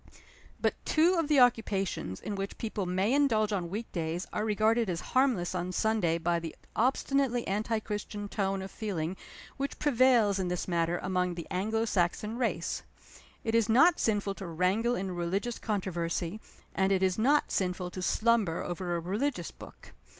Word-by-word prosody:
But - - +2
two 330 +3 +3
of 330 -4 +1
the 295 -2 +4
occupations 195 - +1
in 210 - -5
which 195 0 -4
people 215 -4 -3
may 190 +6 +1
indulge 225 -7 +3
on 175 -4 -2
week 215 +5 -5
days 170 +1 -2
are 210 - -1
regarded 220 +1 +2
as 170 -2 -1
harmless 255 -10 +2
on 180 0 -2
Sunday 185 -4 +1
by 170 +1 0
the 165 -1 -7 0.2
obstinately 260 0 +1
anti 215 +3 0
Christian 210 -1 -5
tone 195 -1 -1
of 190 - -8
feeling 185 -5 -3 0.4
which 275 +1 -3
prevails 245 -7 +4
in 185 - -1
this 180 0 -2
matter 170 -1 +1
among 180 -1 0
the 170 - -6
Anglo 220 +5 0
Saxon 210 +2 0
race. 195 -8 -1 0.6
It 225 - -1
is 230 -1 +3
not 310 +10 +5
sinful 205 -3 +1
to 190 - -4
wrangle 190 +8 +1
in 190 -2 -3
religious 185 +7 -2
controversy; 180 -2 -2 0.3
and 190 0 +1
it 190 -1 +2
is 185 +1 +1
not 285 +6 +3
sinful 180 -1 -1
to 185 - -6
slumber 215 -4 +2
over 175 0 -3
a - - 0
religious 190 - -2
book. - - -14
200 Hz, 170 wpm, -30 LUFS, 180-230 Hz, 0.6 s, not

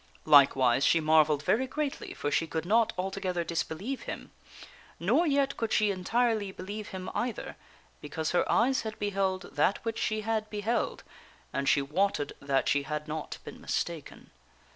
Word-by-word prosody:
Like 140 -2 +7
wise, 130 0 +3
she 165 - +4
marvelled 155 -2 +4
very 250 - +2
greatly, 290 +1 -4
for 145 - -2
she 165 - +1
could 160 0 -3
not 225 +4 +3
altogether 185 -1 -2
disbelieve 170 +9 -3
him. - - -7 0.7
Nor 345 - +2
yet 280 -1 +1
could 225 -1 -2
she 210 -1 +3
entirely 215 +2 0
believe 205 +3 -7
him 185 -1 -6
either, 240 -1 -3 0.5
because 155 +2 -3
her 180 - +1
eyes 260 +3 +3
had 220 -1 -6
beheld 195 -2 -1
that 200 - +1
which 225 -1 -2
she 215 0 0
had 215 0 -1
beheld, 215 +3 -2 0.5
and 140 0 0
she 140 - +3
wotted 155 +1 0
that 140 -1 +1
she 145 - +3
had 150 +2 -4
not 155 0 -5
been - - -10
mistaken. 165 -4 -4
190 Hz, 165 wpm, -29 LUFS, 155-220 Hz, 0.7 s, Like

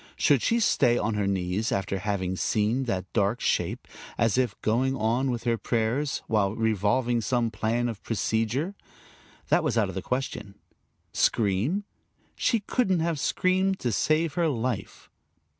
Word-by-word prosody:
Should 140 -5 +3
she 235 - +2
stay 125 - +3
on 115 0 0
her 105 -1 0
knees 95 +3 -1
after 95 0 -1
having 95 -2 -2
seen 110 +7 0
that 95 -5 -3
dark 105 +2 +1
shape, - - -1 0.3
as 115 -3 +2
if 125 -5 0
going 130 +5 +1
on 120 +3 0
with 120 -2 -2
her 115 -1 0
prayers, 120 +5 -1
while 105 -2 +1
revolving 115 +2 +1
some 115 +1 0
plan 115 +2 0
of 115 -4 -5
procedure? 115 - -1 0.8
That - - +3
was - - 0
out - - +2
of - - -6
the - - -3
question. 120 -6 -4 0.6
Scream? 115 - +1 0.5
She 230 -3 +1
couldn't 190 -5 +1
have 165 -2 -1
screamed 185 +5 +1
to 120 - 0
save 155 +7 +1
her 170 0 +1
life. 125 -5 -3
115 Hz, 155 wpm, -27 LUFS, 105-135 Hz, 0.8 s, Should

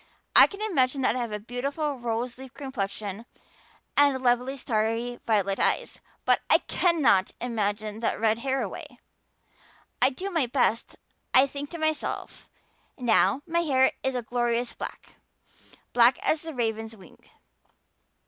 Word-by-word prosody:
I - - +10
can 405 +1 -7
imagine 270 -10 +1
that - - +3
I - - -1
have 235 -2 -3
a 210 - -2
beautiful 275 +5 -3
rose 240 +1 -3
leaf 265 -1 -11
complexion 215 -5 -5 0.7
and 280 -2 +3
lovely 250 +2 +1
starry 230 +1 -1
violet 200 -3 +1
eyes. - - 0 0.3
But - - +3
I - - +7
cannot 290 - +2
imagine 215 -2 -2
that 230 - -1
red 220 0 +2
hair 265 +1 -1
away. 285 - -8 1.0
I 255 - +6
do 375 +9 -5
my 325 -8 +1
best. 240 -2 0 0.4
I 260 +1 +8
think 280 +1 -6
to 340 - -7
myself, 315 -1 -3 0.5
'Now 250 +2 +2
my 340 +1 0
hair 265 -6 +3
is 265 -1 -1
a 245 - -2
glorious 240 +1 -1
black, - - -9 0.8
black 240 +1 +5
as 310 - +2
the 320 -2 -7
raven's 225 -2 -3
wing. 185 -3 -17
245 Hz, 145 wpm, -26 LUFS, 225-275 Hz, 1.0 s, I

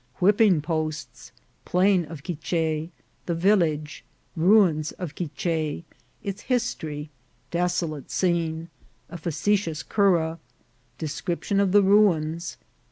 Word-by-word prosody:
— - - -38
Whipping 195 -4 +4
posts. 155 -1 -4 0.2
— - - -40
Plain 185 -1 +3
of 155 -2 -10
Quiche. 160 -1 -2 0.2
— - - -40
The 170 - 0
Village. 165 -5 +1 0.2
— - - -40
Ruins 170 -3 +4
of 175 -6 -6
Quiche. 160 0 -2 0.2
— - - -37
Its 200 +1 -4
History. 160 - -2 0.2
— 125 - -39
Desolate 170 -4 -1
Scene. 165 -2 0 0.2
— - - -39
A - - -6
facetious 165 +1 0
Cura. 170 -5 +2 0.3
— 125 0 -39
Description 175 +6 -2
of 200 -2 +2
the 205 +1 +6
Ruins. 175 -5 +2
165 Hz, 135 wpm, -25 LUFS, 155-190 Hz, 0.3 s, the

